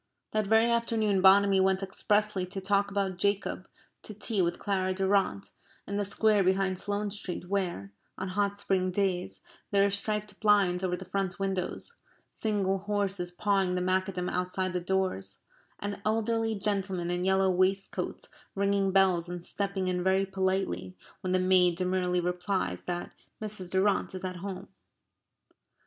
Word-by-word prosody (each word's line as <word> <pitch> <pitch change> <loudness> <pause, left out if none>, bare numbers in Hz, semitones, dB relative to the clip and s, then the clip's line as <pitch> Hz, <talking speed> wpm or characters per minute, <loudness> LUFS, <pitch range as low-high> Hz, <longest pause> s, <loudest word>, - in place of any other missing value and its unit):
That 215 -1 0
very 225 +2 +4
afternoon 225 -4 +1
Bonamy 195 +1 +6
went 190 0 +2
expressly 205 0 0
to 195 +2 -5
talk 200 +1 +1
about 195 -2 -1
Jacob 200 0 -1 0.3
to 215 - -9
tea 215 -1 -1
with 175 0 0
Clara 185 -2 -1
Durrant 190 - +1 0.3
in 200 - -3
the 205 - 0
square 210 0 +3
behind 190 0 +1
Sloane 205 +1 -2
Street 180 -3 -6
where, 175 - -2 0.3
on 190 0 -4
hot 200 +1 0
spring 190 -2 0
days, 180 - -1 0.3
there 200 -1 +4
are 200 - +1
striped 210 0 -2
blinds 200 -4 +3
over 180 -1 0
the 190 - -9
front 190 0 -2
windows, 195 - -3 0.3
single 195 -3 0
horses 200 -2 -1
pawing 190 0 +1
the 180 - 0
macadam 185 0 0
outside 185 +1 -1
the 180 - -1
doors, 185 - -1 0.4
and 205 0 -5
elderly 225 +1 0
gentlemen 195 -4 -1
in 175 0 -1
yellow 190 0 +3
waistcoats 185 +2 -1 0.3
ringing 200 0 +1
bells 185 -3 +3
and 175 -1 -5
stepping 195 -2 -2
in 180 -1 0
very 190 +1 +3
politely 190 - -1 0.2
when 185 - -2
the 185 - +3
maid 185 -1 +4
demurely 180 0 0
replies 180 - -1
that 175 0 -4 0.3
Mrs. 210 -4 -5
Durrant 190 +1 +1
is 185 - -6
at 185 -1 -4
home. 190 +1 -6
190 Hz, 155 wpm, -29 LUFS, 185-200 Hz, 0.4 s, Bonamy